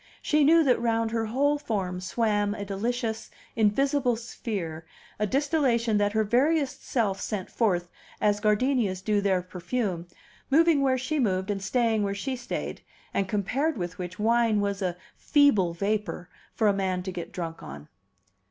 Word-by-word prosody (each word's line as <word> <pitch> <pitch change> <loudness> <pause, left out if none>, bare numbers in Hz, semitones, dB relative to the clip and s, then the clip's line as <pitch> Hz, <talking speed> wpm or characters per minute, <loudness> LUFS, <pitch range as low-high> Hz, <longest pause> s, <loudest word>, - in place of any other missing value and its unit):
She 305 -1 +3
knew 325 +3 +6
that 255 -5 +2
round 230 -1 +1
her 225 -1 -1
whole 285 +6 +1
form 190 -9 -2
swam 205 +1 0
a 205 - -5
delicious, 220 +3 -3 0.3
invisible 250 +4 +2
sphere, 200 -8 -5 0.4
a 210 - +1
distillation 255 -5 +1
that 205 0 +1
her 220 0 +2
veriest 275 +6 +1
self 210 -6 -1
sent 200 -4 -4
forth, 180 -7 +1 0.3
as 205 0 +2
gardenias 210 -3 +1
do 210 0 +1
their 190 -3 +1
perfume, 180 0 -3 0.4
moving 320 +1 +4
where 265 -1 +2
she 280 +4 -2
moved 190 -4 0
and 195 -1 -3
staying 225 +1 +1
where 200 -1 -1
she 260 +6 -3
stayed, 245 - -5 0.3
and 195 -1 0
compared 255 +9 0
with 180 -1 -5
which 180 +1 -6
wine 225 0 +2
was 200 0 -1
a 180 -2 -1 0.2
feeble 215 - +3
vapor 200 -2 -2 0.3
for 220 - +2
a 205 - +4
man 190 -2 -1
to 190 - -4
get 175 -2 -6
drunk 165 -2 -5
on. 75 +2 -9
215 Hz, 160 wpm, -27 LUFS, 190-250 Hz, 0.4 s, knew